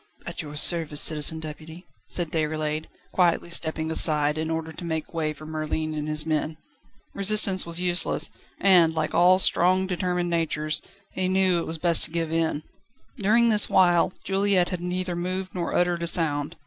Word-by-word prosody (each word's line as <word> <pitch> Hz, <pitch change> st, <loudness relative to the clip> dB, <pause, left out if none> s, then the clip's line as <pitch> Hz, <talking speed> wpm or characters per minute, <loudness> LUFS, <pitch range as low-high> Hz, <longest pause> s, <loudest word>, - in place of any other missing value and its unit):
"At -, -, -6 dB
your 150 Hz, -1 st, -9 dB
service, 155 Hz, -1 st, +3 dB
Citizen 155 Hz, +1 st, -1 dB
Deputy!" 160 Hz, +3 st, -10 dB, 0.2 s
said 170 Hz, -3 st, -2 dB
Déroulède, 155 Hz, -1 st, -2 dB, 0.3 s
quietly 170 Hz, -1 st, +1 dB
stepping 160 Hz, -1 st, -1 dB
aside, 150 Hz, -2 st, +4 dB
in 160 Hz, 0 st, -3 dB
order 160 Hz, 0 st, -4 dB
to 165 Hz, -, -10 dB
make 160 Hz, -1 st, -4 dB
way 160 Hz, -2 st, -1 dB
for 155 Hz, +1 st, -11 dB
Merlin 155 Hz, 0 st, -3 dB
and 150 Hz, 0 st, -4 dB
his 155 Hz, 0 st, 0 dB
men. 155 Hz, 0 st, -2 dB, 0.6 s
Resistance 195 Hz, -2 st, +1 dB
was 170 Hz, 0 st, -3 dB
useless, 180 Hz, 0 st, 0 dB, 0.3 s
and, 175 Hz, -4 st, +4 dB
like 155 Hz, -1 st, -2 dB
all 180 Hz, +2 st, +5 dB
strong, 185 Hz, 0 st, +4 dB
determined 180 Hz, -1 st, -2 dB
natures, 155 Hz, -2 st, -1 dB, 0.3 s
he 185 Hz, 0 st, -2 dB
knew 190 Hz, 0 st, +2 dB
when 170 Hz, -, +1 dB
it -, -, -6 dB
was 160 Hz, -, -4 dB
best 170 Hz, 0 st, +1 dB
to -, -, -7 dB
give 165 Hz, -1 st, -3 dB
in. 160 Hz, -2 st, -1 dB, 0.6 s
During 225 Hz, +4 st, +3 dB
this 210 Hz, -2 st, +3 dB
while, 175 Hz, -2 st, +3 dB
Juliette 195 Hz, -2 st, +1 dB
had 180 Hz, -2 st, -5 dB
neither 180 Hz, 0 st, -3 dB
moved 185 Hz, +2 st, -4 dB
nor 175 Hz, -2 st, -3 dB
uttered 175 Hz, -1 st, +1 dB
a 170 Hz, -, -2 dB
sound. 155 Hz, -2 st, +1 dB
170 Hz, 175 wpm, -25 LUFS, 155-180 Hz, 0.6 s, all